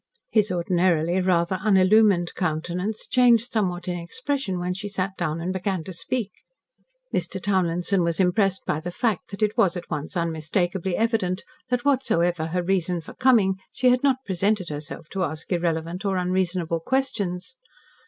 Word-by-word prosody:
His 215 -2 +2
ordinarily 175 -1 +1
rather 180 0 +2
unillumined 195 -2 +4
countenance 180 +5 -2
changed 245 -2 +4
somewhat 180 -5 -1
in 175 -1 -2
expression 255 +2 -3
when 180 +1 -2
she 205 +2 -5
sat 190 0 -2
down 160 -3 -2
and 180 +3 -2
began 190 -2 -2
to 185 - -7
speak. 205 +5 -3 0.8
Mr. 180 +2 -1
Townlinson 185 -1 +1
was 170 0 0
impressed 190 +1 +2
by 150 - 0
the 175 - -5
fact 210 +1 -1
that 200 +1 -3
it 210 0 +1
was 185 -1 +3
at 175 - -9
once 150 +4 -3
unmistakably 170 +3 -1
evident 220 -5 0 0.3
that 250 0 0
whatsoever 175 - +2
her 175 +2 -1
reason 180 -1 0
for 160 - -11
coming, 215 -7 +3
she 255 0 +2
had 250 0 +3
not 270 -2 +1
presented 195 0 0
herself 150 +1 -6
to 190 -1 -2
ask 155 +1 -5
irrelevant 170 +1 -1
or 195 -2 0
unreasonable 180 -2 0
questions. 220 -2 -2
185 Hz, 160 wpm, -24 LUFS, 170-205 Hz, 0.8 s, unillumined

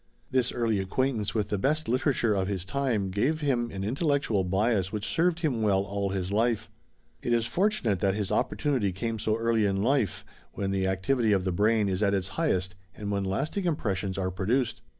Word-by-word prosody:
This 130 -2 +2
early 115 -4 0
acquaintance 110 +3 -1
with 105 -2 0
the 105 - -1
best 155 +6 0
literature 125 -2 +1
of 95 -2 0
his 95 -3 -3
time 115 -5 -1
gave 135 +11 0
him 125 -5 +1
an 95 0 -5
intellectual 135 - +1
bias 95 +1 +1
which 105 0 -3
served 175 +1 +1
him 135 -9 0
well 100 -3 +2
all 100 0 -2
his 95 -1 -3
life. 115 +2 0 0.5
It 120 - 0
is 115 -1 +2
fortunate 175 - +1
that 95 +2 +1
his 105 -2 -2
opportunity 130 -10 0
came 110 +4 -3
so 110 +1 0
early 115 -1 +1
in 100 -1 +1
life, 120 - +1 0.3
when 100 -1 -2
the 95 -1 0
activity 105 +4 +1
of 95 -2 +1
the 95 - 0
brain 105 +3 +2
is 95 0 -1
at 100 -1 +3
its 95 -1 -2
highest 95 - 0 0.2
and 105 -1 -4
when 100 -1 0
lasting 145 - -2
impressions 100 - -1
are 95 -1 -1
produced. 115 +6 0
105 Hz, 195 wpm, -28 LUFS, 95-130 Hz, 0.5 s, at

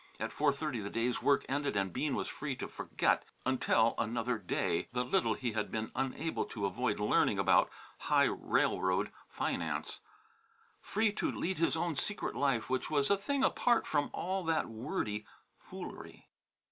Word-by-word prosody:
At - - -2
four 145 -1 +3
thirty 140 -3 -3
the 100 -1 -4
day's 115 +1 0
work 140 - +3
ended 140 -4 -1
and 95 -2 0
Bean 150 -4 0
was - - -2
free 140 -3 -4
to - - -5
forget - - 0 0.2
until 120 -3 +3
another 115 +1 0
day 90 -3 -1
the 125 0 0
little 190 +6 +2
he 125 -3 -2
had 105 -1 -2
been 110 0 -3
unable 135 +5 -1
to 105 -4 -4
avoid 95 - 0
learning - - +3
about - - +4 0.3
high - - +3
railroad 95 0 +1 0.2
finance; - - -2 0.8
free 220 +1 +1
to - - -1
lead 185 -1 -2
his 165 0 +2
own 170 -1 0
secret 205 +8 -2
life, 135 -5 +1
which 130 -1 -1
was 145 0 +2
a - - +6
thing 270 +7 -1
apart 240 -3 +3
from 145 - +1
all 190 +1 -2
that 160 -1 +1
wordy 110 -2 -3 0.3
foolery. - - -9
135 Hz, 165 wpm, -33 LUFS, 115-160 Hz, 0.8 s, a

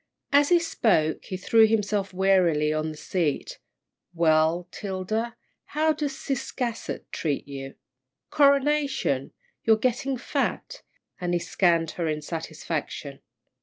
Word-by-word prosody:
As 285 0 +5
he 350 - +6
spoke, 205 - +1
he 185 - -4
threw 220 +4 +5
himself 210 -2 0
wearily 180 -5 +3
on 155 0 -1
the 155 - -8
seat. 160 -3 -2 0.6
"Well, 165 +1 +3
'Tilda, 215 +4 -3 0.4
how 315 0 +4
does 295 -2 -3
Ciscasset 245 -3 -3
treat 145 -4 -2
you? 135 -1 -7 0.6
Coronation! 280 - +2 0.3
You're 220 -1 +5
getting 255 +3 0
fat," - - -2 0.4
and 175 -1 -1
he - - +2
scanned 170 -2 +1
her 170 0 -3
in 155 -1 -2
satisfaction. 155 -3 -5
185 Hz, 120 wpm, -26 LUFS, 155-250 Hz, 0.6 s, he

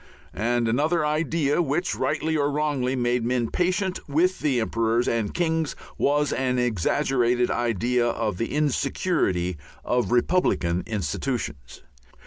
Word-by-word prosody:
And 120 +2 0
another 150 +7 +1
idea 155 0 +1
which, 165 +3 0
rightly 155 +4 -1
or 145 -1 +1
wrongly, 145 -3 0
made 120 -1 0
men 120 -1 0
patient 185 +1 0
with 175 +6 +2
the 140 -5 +1
emperors 115 +1 0
and 115 -3 0
kings 160 -3 -1 0.2
was 145 +1 +1
an 130 -1 0
exaggerated 125 - +1
idea 120 +1 +1
of 110 -5 -2
the 115 - -2
insecurity 140 - 0 0.3
of 125 -1 0
republican 120 - +2
institutions. 85 - -4
125 Hz, 120 wpm, -25 LUFS, 115-150 Hz, 0.3 s, with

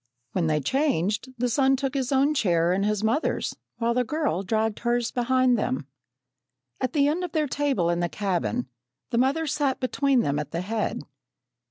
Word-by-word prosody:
When 170 -3 0
they 155 -1 +2
changed, 220 - 0
the 245 +1 +1
son 270 +2 +3
took 270 0 -2
his 265 -2 -1
own 275 +2 +3
chair 175 - +2
and 195 +2 0
his 210 0 0
mother's, 230 +8 0 0.2
while 235 0 +1
the 250 +1 +2
girl 295 - -1
dragged 220 +2 -1
hers 240 0 0
behind 255 -1 +2
them. 135 -7 -1 0.9
At 255 -1 -2
the 285 -2 +3
end 325 +5 0
of 355 - -5
their 310 -1 +2
table 270 -11 0
in 170 - 0
the 175 0 0
cabin, 165 - -1 0.4
the 235 - +2
mother 280 +6 +2
sat 285 -2 0
between 270 0 +2
them 145 -4 0
at 150 -1 -4
the 165 +2 -3
head. 215 +3 -2
240 Hz, 185 wpm, -26 LUFS, 185-275 Hz, 0.9 s, son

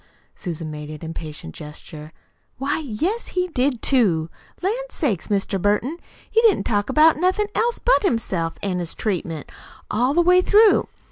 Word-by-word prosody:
Susan 165 -3 -5
made 150 0 -7
an 155 - -6
impatient 155 - -7
gesture. 150 +1 -10 0.5
"Why, 275 +4 -1
yes, 315 - -2
he 360 0 +1
did, 255 -5 0
too! 175 - +2 0.3
Lan' 390 +3 +2 0.2
sakes, 225 - -1
Mr. 195 -2 -1
Burton, 225 - 0 0.3
he 450 - +4
didn't 445 -5 +4
talk 205 -2 0
about 310 +1 +5
nothin' 375 +5 +1
else 470 +1 +1
but - - +3
himself 190 - -1
an' 185 -3 -1
his 170 -2 -4
treatment, 170 -7 -3 0.4
all 250 +6 +1
the 345 - +5
way 360 +1 +5
through. 425 +3 +5
230 Hz, 155 wpm, -22 LUFS, -, 0.5 s, about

